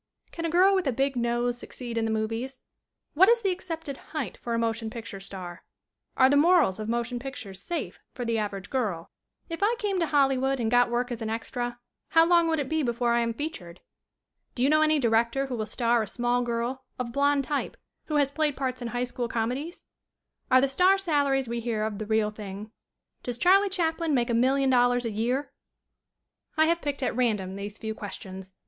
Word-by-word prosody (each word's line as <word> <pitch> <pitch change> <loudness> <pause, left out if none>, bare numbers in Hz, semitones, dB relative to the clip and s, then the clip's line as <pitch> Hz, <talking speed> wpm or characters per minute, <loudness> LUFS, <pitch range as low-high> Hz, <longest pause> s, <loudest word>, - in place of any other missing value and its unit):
"Can 335 - -4
a - - 0
girl 370 +4 +5
with 375 -5 +1
a - - +3
big 270 +2 0
nose 240 0 0
succeed 240 -2 -7
in 225 -1 0
the - - -1
movies?" 225 +4 -2 0.6
"What 380 +7 +6
is 470 0 +4
the 390 - +2
accepted 325 -6 -5
height 280 - -5
for 235 -1 -4
a - - 0
motion 225 -1 -1
picture 230 -3 -7
star 185 -2 -8 0.3
?" - - -47
"Are 260 - +7
the 280 - +3
morals 305 - +4
of 215 0 -4
motion 235 +1 -1
pictures 210 -8 -8
safe 345 - -4 0.2
for 245 - -4
the 230 -1 0
average 200 -2 -4
girl?" 205 -11 -2 0.4
"If 330 -1 -5
I 435 +4 +3
came 410 -5 -1
to 335 - +1
Hollywood 270 -2 +2
and 225 -2 0
got 245 0 +4
work 245 +1 -1
as 235 -1 -4
an 220 - -2
extra 240 +2 -3 0.3
how 325 0 +5
long 340 -1 +4
would 325 -1 +1
it 285 -3 -2
be 315 +1 0
before 240 -2 0
I 235 - +3
am 230 0 0
featured?" 185 - -6 0.8
"Do 245 - 0
you 275 - +4
know 310 0 +5
any 310 0 +4
director 235 +1 +2
who 265 -2 -4
will 215 -2 -3
star 235 +1 +1
a 215 - -3
small 245 +3 0
girl, 240 +2 -2
of 240 -2 -4
blond 280 0 +2
type, 285 +1 -3 0.3
who 305 - -3
has 285 -2 +3
played 300 -2 0
parts 255 -2 -2
in 240 - -3
high 245 +1 -2
school 245 -1 -3
come 225 0 -1
dies?" 300 +7 -6 0.7
"Are 255 0 +6
the 275 - +3
star 365 +8 +4
salaries 285 -8 +1
we 235 +1 -2
hear 225 -2 -2
of 215 -1 -3
the 215 - -5
real 220 -1 +1
thing?" 210 0 -8 0.5
"Does 245 -1 -4
Charlie 390 +6 +5
Chaplin 330 -4 0
make 240 -1 +1
$1,000,000 245 0 +3
a 230 - -1
year?" 245 +7 -1 1.0
I 315 - +5
have 335 +1 +1
picked 285 -2 -3
at 250 - -1
random 210 -7 0
these 205 +1 -6
few 220 0 -4
questions. 190 -2 -8
245 Hz, 210 wpm, -27 LUFS, 225-290 Hz, 1.0 s, Are